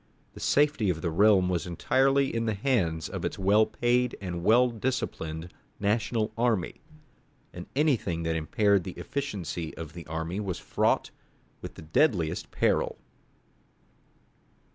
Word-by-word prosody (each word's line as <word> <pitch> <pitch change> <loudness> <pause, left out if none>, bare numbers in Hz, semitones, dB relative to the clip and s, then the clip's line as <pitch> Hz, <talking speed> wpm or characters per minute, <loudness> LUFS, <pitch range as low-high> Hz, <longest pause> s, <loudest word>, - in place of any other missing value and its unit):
The - - -11
safety 145 -8 +2
of 80 -2 -2
the 85 - 0
realm 100 +1 +4
was 90 0 -1
entirely 135 +10 +2
in 115 0 -1
the 110 - 0
hands 95 - 0
of - - -6
its - - -3
well 105 +3 +4
paid 125 +1 0
and 90 -3 -5
well 120 +5 +5
disciplined 90 -9 -3 0.3
national 110 +1 0
army, 115 -7 0 0.7
and 90 0 -8
anything 110 - +1
that 80 0 -1
impaired 100 +5 +2
the 95 - -6
efficiency 95 - -4
of 80 -1 -7
the 85 -1 -10
army 80 +4 -3
was 95 -5 -3
fraught - - 0 0.5
with - - -8
the - - -10
deadliest 85 - +1
peril. - - 0
100 Hz, 140 wpm, -28 LUFS, 85-120 Hz, 0.7 s, well